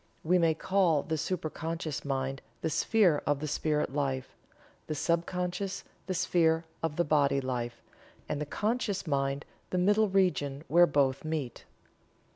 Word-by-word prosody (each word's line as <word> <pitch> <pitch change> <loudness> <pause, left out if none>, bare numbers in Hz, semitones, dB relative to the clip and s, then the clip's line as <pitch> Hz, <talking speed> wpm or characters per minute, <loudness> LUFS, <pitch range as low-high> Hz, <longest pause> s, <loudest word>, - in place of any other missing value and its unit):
We 180 +3 +3
may 165 -2 +3
call 170 -4 +2
the 160 - -2
supra 160 0 -2
conscious 165 -2 -4
mind 135 -1 -2 0.2
the 160 - -1
sphere 175 -1 +3
of 145 -1 +2
the 155 - -3
spirit 150 -1 0
life, 135 -3 -2 0.5
the 155 - -2
sub 170 +3 +1
conscious 180 +2 -3 0.2
the 185 - -1
sphere 165 -1 +2 0.2
of 165 -2 -1
the 175 - +2
body 140 -2 +3
life, 120 -3 -4 0.4
and 150 - -2
the 150 - -3
conscious 210 - -1
mind 140 -1 -1 0.2
the 185 - -1
middle 205 +4 +3
region 165 -7 +1
where 175 +2 +6
both 135 -3 +1
meet." 155 -5 -4
155 Hz, 155 wpm, -30 LUFS, 140-180 Hz, 0.5 s, where